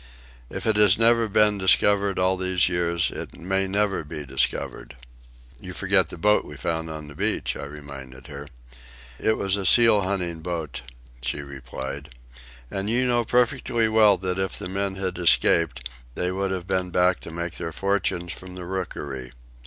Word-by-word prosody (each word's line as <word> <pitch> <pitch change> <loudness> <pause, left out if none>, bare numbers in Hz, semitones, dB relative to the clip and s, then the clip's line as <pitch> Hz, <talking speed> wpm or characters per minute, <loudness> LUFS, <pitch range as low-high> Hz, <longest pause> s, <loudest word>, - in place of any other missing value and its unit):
If - - -6
it 110 -2 +2
has 105 -2 +6
never 115 0 +4
been 105 0 +3
discovered 100 +1 +3
all 95 +1 +2
these 95 -1 +1
years, 85 -1 0
it - - -7
may 95 +2 -1
never 100 -2 0
be 75 0 -7
discovered." 70 - -2 0.6
"You - - -8
forget - - +2
the - - -8
boat 105 +5 +3
we 75 - -10
found 80 +2 -2
on 75 -1 -7
the 75 - -10
beach," - - -1
I - - -6
reminded 70 -3 -10
her. 70 0 -9 0.7
"It 110 - +1
was 95 0 +1
a 100 - -2
seal 115 +2 +6
hunting 90 -3 -2
boat," 80 -3 -4 0.4
she 65 +3 -3
replied, 70 +1 -7 0.6
"and 95 +1 -3
you 125 +3 +2
know 120 -1 +2
perfectly 120 -1 +1
well 110 -2 +5
that 95 0 -3
if 95 0 -1
the - - -5
men 100 0 -2
had 95 -1 -3
escaped 85 -6 +3 0.3
they 90 0 -1
would 95 +1 -1
have 95 -2 -3
been 95 -1 -1
back 90 0 +2
to - - -10
make 85 +1 -4
their 85 -1 -4
fortunes 95 -1 -1
from 90 0 -10
the 90 -1 -7
rookery. 70 -9 -5
90 Hz, 175 wpm, -24 LUFS, 80-100 Hz, 0.7 s, has